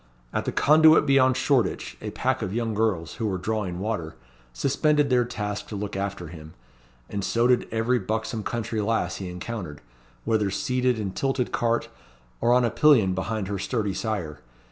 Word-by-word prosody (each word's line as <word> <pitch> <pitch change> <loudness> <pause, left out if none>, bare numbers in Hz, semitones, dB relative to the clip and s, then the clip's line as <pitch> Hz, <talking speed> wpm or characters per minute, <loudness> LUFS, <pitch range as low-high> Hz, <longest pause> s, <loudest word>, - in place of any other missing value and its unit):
At - - -1
the - - -1
Conduit 155 +2 +6
beyond 130 -2 +4
Shoreditch, 130 -6 0
a - - -4
pack - - -1
of 95 - -3
young 115 -2 -1
girls, 100 -7 0
who 110 - -1
were 95 -2 -1
drawing 95 -2 -2
water, 95 -5 -3 0.4
suspended 140 - +1
their 125 -1 +4
task 105 -3 -4
to 105 - -6
look 100 -1 -4
after 95 -3 -4
him; 80 -1 -11 0.5
and 100 -1 -4
so 115 +4 +1
did 125 0 +3
every 115 +3 +1
buxom 110 +2 -3
country 110 0 -3
lass 105 -4 0
he 95 -2 -5
encountered, 90 -4 -6 0.5
whether 105 -3 +1
seated 125 +4 0
in 100 -3 -3
tilted 135 +4 -1
cart, 115 0 0 0.5
or 120 - +3
on 125 0 +4
a 115 - 0
pillion 120 -12 +4
behind 100 +2 -3
her 100 -1 -3
sturdy 105 -1 -1
sire. 95 -8 -3
110 Hz, 175 wpm, -25 LUFS, 95-120 Hz, 0.5 s, Conduit